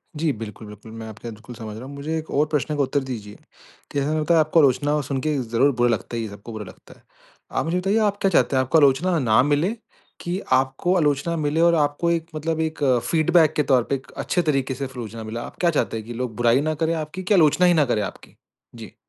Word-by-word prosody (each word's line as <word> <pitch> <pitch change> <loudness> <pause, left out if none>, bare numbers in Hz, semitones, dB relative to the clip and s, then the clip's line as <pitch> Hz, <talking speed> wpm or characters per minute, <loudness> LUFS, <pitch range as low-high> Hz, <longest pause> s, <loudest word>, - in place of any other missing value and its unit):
जी, 155 +1 0
बिल्कुल, 110 -1 -8
बिल्कुल। 105 +2 -12
मैं 110 0 -8
आपकी 110 +2 -10
बात 115 - -6
बिल्कुल 115 +3 -12
समझ 110 -2 -7
रहा 120 - -8
हूँ। 140 - -9
मुझे 155 +3 -3
एक 160 0 -6
और 145 +2 +2
प्रश्न 150 0 -1
का - - +2
उत्तर 135 +2 0
दीजिए, 110 -6 -7 0.6
की 145 - -1
जैसा 155 +3 +2
आपको 155 +2 +3
आलोचना 145 +1 +3
सुनके 145 +2 -1
ज़रूर 125 +3 +2
बुरा 120 0 +2
लगता 115 +1 -2
ही 115 - -2
है, 110 - -5
सबको 100 +3 -10
बुरा 110 -2 -6
लगता 95 - -15
है। - - -30 0.5
आप - - -1
मुझे 165 +3 0
बताइए 195 +4 +1
आप 205 -2 +1
क्या 195 - +2
चाहते 150 - +2
हैं, 130 - +4
आपको 130 +5 +2
आलोचना 155 +5 +3
ना 120 -3 +4
मिले? 150 - +1 0.5
कि 175 +2 -3
आपको 135 +7 +1
आलोचना 150 0 +1
मिले 155 +1 0
और 170 0 +5
आपको 150 +2 +1
एक 165 -1 -1
मतलब 160 +1 -2
एक 160 0 -3 0.3
फीडबैक 160 -1 +3
के 150 - +1
तौर 125 -2 +5
पे, 140 - -1
एक 130 - -10
अच्छे 175 - -1
तरीक़े 135 -4 0
से 135 +2 -4
आलोचना 115 -4 -7
मिले? 110 +2 -5
आप - - -8
क्या 175 - +4
चाहते 150 -7 -1
हैं 110 - -7
कि 120 - -7
लोग 120 -1 -4
बुराई 120 +3 +3
ना 155 +1 0
करें 160 +1 +1
आपकी, 160 +4 -5
कि 195 - +1
आलोचना 175 -1 +4
ही 175 - +5
ना 155 -3 +3
करें 115 -4 0
आपकी? 100 - -8 0.4
जी। - - -11
145 Hz, 245 wpm, -23 LUFS, 120-160 Hz, 0.6 s, और